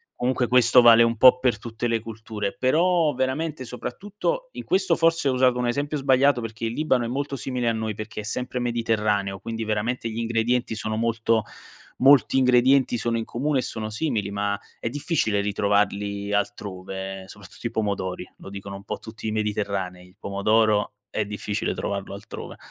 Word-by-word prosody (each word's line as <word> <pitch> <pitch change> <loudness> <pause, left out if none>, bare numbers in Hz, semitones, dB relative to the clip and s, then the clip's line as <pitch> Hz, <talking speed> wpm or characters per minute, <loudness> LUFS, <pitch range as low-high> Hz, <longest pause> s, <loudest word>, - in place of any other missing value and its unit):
comunque 125 -1 0
questo 125 0 +6
vale 115 0 +8
un 115 0 +1
po' 125 +2 +8
per 125 -4 +1
tutte 115 +1 -4
le 115 -1 +1
culture. 110 -2 -5
Però 160 +3 +3
veramente 130 +2 -2
soprattutto 205 - -4
in - - -7
questo 190 -3 +2
forse 165 -3 +3
ho 130 - +2
usato 125 -1 +3
un 125 - 0
esempio 145 +4 -1
sbagliato 135 -1 +3
perché 115 -1 -7
il 115 - -2
Libano 130 -4 +1
è 115 - -2
molto 140 +2 -3
simile 125 -1 -2
a 115 - +2
noi, 110 -1 -2
perché 110 +1 -6
è - - -10
sempre 125 +3 -3
mediterraneo 105 -5 0
quindi 115 +3 -5
veramente 110 +3 -1
gli 110 - -6
ingredienti 115 +1 0
sono 110 0 -3
molto 115 -1 +1 0.6
molti 135 0 +5
ingredienti 125 0 +4
sono 115 +2 -1
in 115 - -2
comune 140 +3 -1
e - - -6
sono 110 -1 -4
simili 110 -5 -2
ma 100 0 -1 0.2
è - - -2
difficile 140 - 0
ritrovarli 100 0 0
altrove, 95 -1 -4
soprattutto 100 +1 -13
i 115 - -1
pomodori, 100 -5 -2
lo - - -10
dicono 100 0 -7
un 100 - -12
po' - - -4
tutti 110 0 -8
i - - 0
mediterranei: 100 -4 -2
il 90 - -24
pomodoro 105 +1 +1 0.2
è 110 - -1
difficile 105 +1 -3
trovarlo 100 -1 -4
altrove. 100 +2 -9
115 Hz, 175 wpm, -24 LUFS, 105-130 Hz, 0.6 s, vale